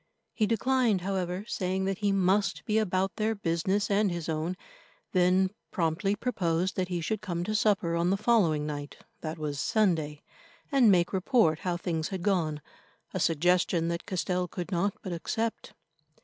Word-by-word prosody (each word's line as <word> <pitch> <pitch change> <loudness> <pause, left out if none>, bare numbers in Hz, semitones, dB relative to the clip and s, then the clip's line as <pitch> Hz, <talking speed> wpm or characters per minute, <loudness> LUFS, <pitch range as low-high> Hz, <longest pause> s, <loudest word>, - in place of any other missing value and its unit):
He 215 - +1
declined, 230 -2 +2
however, 185 0 -2
saying 190 -1 -1
that 195 -1 -2
he 205 -2 +1
must 195 +1 +1
be 215 0 +2
about 190 -1 0
their 220 0 0
business 190 +2 0
and 200 0 +3
his 170 -2 -4
own, 160 +3 -2 0.5
then 185 +1 +3 0.2
promptly 175 +3 0
proposed 185 -6 -1
that 185 -1 -1
he 175 -2 -2
should 215 +6 -2
come 175 -5 -3
to 215 - -2
supper 205 -5 +2
on 170 +1 +1
the 195 - +2
following 195 -9 +2
night 145 -1 -5 0.2
that 160 0 -5
was—Sunday—and 190 - 0
make 175 -1 +3
report 190 - +3
how 180 -2 -2
things 165 -3 -2
had 190 -3 -5
gone, 165 -7 0 0.5
a - - -2
suggestion 170 +1 +2
that 170 +2 -4
Castell 180 -1 -1
could 180 +2 -6
not 190 +3 0
but 185 - -4
accept. 225 +7 -3
185 Hz, 160 wpm, -29 LUFS, 170-205 Hz, 0.5 s, and